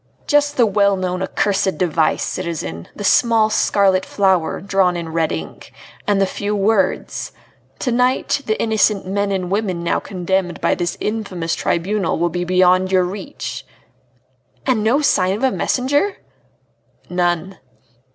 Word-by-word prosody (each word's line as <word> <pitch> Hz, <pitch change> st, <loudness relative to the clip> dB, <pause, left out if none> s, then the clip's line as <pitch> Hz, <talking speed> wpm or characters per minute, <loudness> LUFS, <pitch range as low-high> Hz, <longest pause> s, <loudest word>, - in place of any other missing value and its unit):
"Just 290 Hz, 0 st, +2 dB
the 240 Hz, -, +5 dB
well 200 Hz, -1 st, +2 dB
known 185 Hz, 0 st, -2 dB
accursed 190 Hz, 0 st, 0 dB
device, 165 Hz, -3 st, +1 dB
citizen, 155 Hz, -, -4 dB
the 205 Hz, -, -6 dB
small 220 Hz, +1 st, +3 dB
scarlet 195 Hz, -3 st, +2 dB
flower, 190 Hz, -5 st, +1 dB
drawn 190 Hz, -2 st, +1 dB
in 170 Hz, -1 st, -5 dB
red 160 Hz, -1 st, 0 dB
ink, 80 Hz, -1 st, -7 dB, 0.4 s
and 205 Hz, -1 st, +2 dB
the 195 Hz, -, +4 dB
few 205 Hz, +2 st, -3 dB
words: 200 Hz, -1 st, 0 dB, 0.5 s
'To 250 Hz, -, -2 dB
night 250 Hz, +3 st, +1 dB
the 215 Hz, -, 0 dB
innocent 215 Hz, -2 st, +1 dB
men 200 Hz, +1 st, -1 dB
and 185 Hz, -2 st, -2 dB
women 195 Hz, -4 st, -1 dB
now 170 Hz, -, +1 dB
condemned 185 Hz, -1 st, -2 dB
by -, -, +2 dB
this 175 Hz, -1 st, -2 dB
infamous 200 Hz, -6 st, -3 dB
tribunal 190 Hz, +1 st, -1 dB
will 170 Hz, +1 st, +1 dB
be 175 Hz, +2 st, -3 dB
beyond 185 Hz, +1 st, +3 dB
your 185 Hz, -1 st, +4 dB
reach!'" 195 Hz, +9 st, -6 dB, 1.0 s
"And 245 Hz, -6 st, +1 dB
no 245 Hz, +7 st, +3 dB
sign 190 Hz, -9 st, +2 dB
of 215 Hz, -, -6 dB
a 265 Hz, -, +3 dB
messenger?" 285 Hz, +14 st, 0 dB, 0.9 s
"None." 175 Hz, 0 st, -1 dB
190 Hz, 145 wpm, -19 LUFS, 180-215 Hz, 1.0 s, the